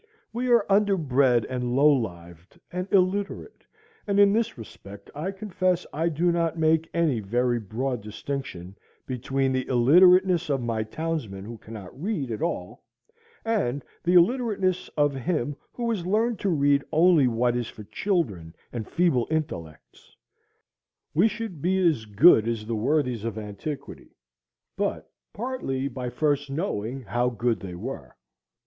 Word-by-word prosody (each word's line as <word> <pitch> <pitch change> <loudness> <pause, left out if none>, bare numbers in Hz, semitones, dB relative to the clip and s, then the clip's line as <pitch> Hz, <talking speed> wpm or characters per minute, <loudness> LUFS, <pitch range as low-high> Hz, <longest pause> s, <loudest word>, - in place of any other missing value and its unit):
We 245 +2 -2
are 235 -4 +4
underbred 145 - +3
and 125 -1 -2
low 145 +2 +6
lived 85 - -6
and 180 +2 -4
illiterate; 200 - 0 0.4
and 200 0 +2
in 200 0 +6
this 230 -4 0
respect 100 -2 -12
I 155 +6 -3
confess 185 -3 -1
I 165 +3 0
do 170 +3 +1
not 170 -1 0
make 160 0 +2
any 160 -8 +1
very 120 +4 0
broad 120 +4 -3
distinction 105 -4 -6 0.3
between 135 +1 -1
the 130 -1 -1
illiterateness 175 +7 +5
of 140 -2 +1
my 115 -2 -2
townsman 110 -5 -4
who 115 0 -8
cannot 110 +3 -10
read 175 - -2
at 110 - -4
all, 170 - -3 0.6
and 145 - -1 0.2
the 180 +1 +2
illiterateness 195 -2 +2
of 145 -1 +3
him 145 0 -2 0.2
who 240 -1 -4
has 205 -6 -2
learned 220 +5 +1
to 200 - 0
read 140 -4 +3
only 160 -3 +5
what 120 +1 +1
is 120 -2 -2
for 105 - -10
children 100 - -2 0.2
and 115 -3 -4
feeble 165 -9 +2
intellects. 85 - -5 1.0
We 180 +8 +4
should 220 -8 -5
be 185 +4 +1
as 135 -10 0
good 110 - +6
as 115 -2 -2
the 115 +1 -2
worthies 125 -1 0
of 115 -2 -4
antiquity, 110 +7 -7 0.6
but - - -3 0.2
partly 205 - -3
by 125 -2 -5
first 145 +2 0
knowing 135 - -3
how 120 +4 0
good 120 -1 -1
they 90 -3 -7
were. 90 - -7
140 Hz, 145 wpm, -26 LUFS, 115-180 Hz, 1.0 s, low